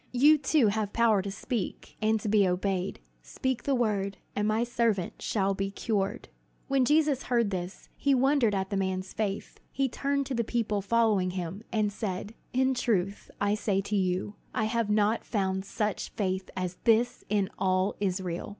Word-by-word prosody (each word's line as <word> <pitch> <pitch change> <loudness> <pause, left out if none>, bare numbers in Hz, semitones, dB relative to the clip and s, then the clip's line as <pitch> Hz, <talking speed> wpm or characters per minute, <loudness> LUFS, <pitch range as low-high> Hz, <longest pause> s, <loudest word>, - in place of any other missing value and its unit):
You, 295 +5 +6
too, 270 -4 +3
have 210 0 -2
power 225 -4 +4
to 200 - -5
speak 210 0 -4
and 220 0 +2
to - - -4
be 205 -2 +4
obeyed. 185 +1 -1 0.2
Speak 260 -3 -2
the 275 - +1
word, 200 -5 0 0.2
and 210 0 +1
my 215 +2 +2
servant 230 -6 0
shall 195 -2 +1
be 195 0 -2
cured." 205 +1 -2 0.4
When 270 -2 +3
Jesus 295 -2 +3
heard 235 -4 +2
this, 180 0 -5
he 280 -1 +2
wondered 260 -4 +3
at 190 0 -2
this 200 - 0
man's 190 0 -2
faith. 205 -2 -3
He 275 -1 +1
turned 280 +2 -1
to 265 - -4
the 235 -1 +1
people 220 -3 -1
following 210 -3 +2
him, 180 +1 -4
and 210 -2 +1
said: 200 0 -4 0.2
"In 260 +1 +2
truth 200 -6 -1
I 205 0 +2
say 205 -2 0
to 205 +2 -3
you, 185 +1 0 0.2
I 220 - +1
have 230 -1 0
not 210 +2 +2
found 190 -3 -1
such 210 -1 -2
faith 190 -2 -2
as 180 -1 -3
this 235 +1 +3
in 200 -2 +1
all 185 +1 +2
Israel!" 185 -3 -2
210 Hz, 175 wpm, -29 LUFS, 195-235 Hz, 0.4 s, You